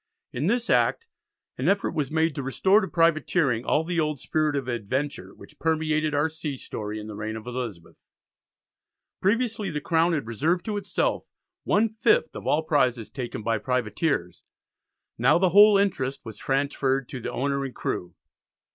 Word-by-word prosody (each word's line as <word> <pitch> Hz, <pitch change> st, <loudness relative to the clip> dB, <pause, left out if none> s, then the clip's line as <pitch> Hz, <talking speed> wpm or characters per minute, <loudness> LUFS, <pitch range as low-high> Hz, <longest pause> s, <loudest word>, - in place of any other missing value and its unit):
In 135 Hz, +7 st, -1 dB
this 240 Hz, +3 st, +1 dB
Act 460 Hz, -, +2 dB, 0.5 s
an -, -, +2 dB
effort 200 Hz, 0 st, +1 dB
was 145 Hz, -4 st, -2 dB
made 160 Hz, 0 st, +1 dB
to 140 Hz, -, -4 dB
restore 190 Hz, +10 st, +3 dB
to 190 Hz, -, -2 dB
privateering 165 Hz, -7 st, +2 dB
all 150 Hz, -, +1 dB
the 170 Hz, +1 st, -2 dB
old 150 Hz, -3 st, 0 dB
spirit 155 Hz, +1 st, 0 dB
of 135 Hz, -3 st, -2 dB
adventure 130 Hz, +5 st, -3 dB
which -, -, -16 dB
permeated 155 Hz, -1 st, 0 dB
our 145 Hz, +2 st, +2 dB
sea 155 Hz, -3 st, -5 dB
story 105 Hz, -3 st, -6 dB
in 105 Hz, -, -8 dB
the 110 Hz, -, -7 dB
reign 105 Hz, +1 st, -4 dB
of 110 Hz, 0 st, -8 dB
Elizabeth. 120 Hz, -9 st, -6 dB, 1.2 s
Previously 225 Hz, +1 st, 0 dB
the 150 Hz, -, -3 dB
Crown 165 Hz, +2 st, +2 dB
had 145 Hz, -7 st, -1 dB
reserved 155 Hz, -, 0 dB
to 210 Hz, -2 st, -2 dB
itself 200 Hz, -1 st, -1 dB, 0.4 s
one 215 Hz, +3 st, +3 dB
fifth 225 Hz, -, +1 dB
of -, -, -7 dB
all 155 Hz, +2 st, +2 dB
prizes 130 Hz, -7 st, +1 dB
taken 125 Hz, -5 st, -5 dB
by 115 Hz, -1 st, 0 dB
privateers; 120 Hz, -, -1 dB, 0.8 s
now 135 Hz, +7 st, +5 dB
the 185 Hz, +1 st, +3 dB
whole 205 Hz, +3 st, +7 dB
interest 140 Hz, -9 st, 0 dB
was 110 Hz, -2 st, -8 dB
transferred 135 Hz, -1 st, 0 dB
to 130 Hz, -, -6 dB
the -, -, -5 dB
owner 140 Hz, +1 st, -1 dB
and 135 Hz, -2 st, -6 dB
crew. 90 Hz, -1 st, -4 dB
145 Hz, 170 wpm, -25 LUFS, 125-170 Hz, 1.2 s, whole